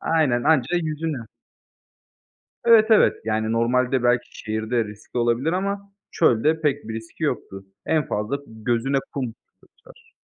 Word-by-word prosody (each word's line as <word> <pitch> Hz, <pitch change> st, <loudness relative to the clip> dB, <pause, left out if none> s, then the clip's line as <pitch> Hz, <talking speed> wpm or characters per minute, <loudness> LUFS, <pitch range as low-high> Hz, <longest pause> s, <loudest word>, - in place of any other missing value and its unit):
Aynen, 145 Hz, -7 st, +1 dB
anca 160 Hz, +2 st, +2 dB
yüzünü. 155 Hz, -5 st, -3 dB, 1.4 s
Evet, 225 Hz, -2 st, +7 dB
evet, 220 Hz, -, +5 dB
yani, 110 Hz, 0 st, -1 dB
normalde 125 Hz, +2 st, +1 dB
belki 120 Hz, 0 st, 0 dB
şehirde 110 Hz, +2 st, -1 dB
riskli 105 Hz, +3 st, -8 dB
olabilir 120 Hz, +7 st, +1 dB
ama 200 Hz, +1 st, -3 dB, 0.2 s
çölde 155 Hz, +2 st, +2 dB
pek 145 Hz, -5 st, -1 dB
bir 110 Hz, -, -4 dB
riski 110 Hz, 0 st, -6 dB
yoktu. 95 Hz, 0 st, -3 dB, 0.2 s
En 155 Hz, -3 st, +1 dB
fazla 105 Hz, +7 st, -2 dB
gözüne 120 Hz, +4 st, -1 dB
kum 125 Hz, -5 st, -3 dB, 0.3 s
kaçar. -, -, -21 dB
125 Hz, 130 wpm, -23 LUFS, 115-160 Hz, 1.4 s, Evet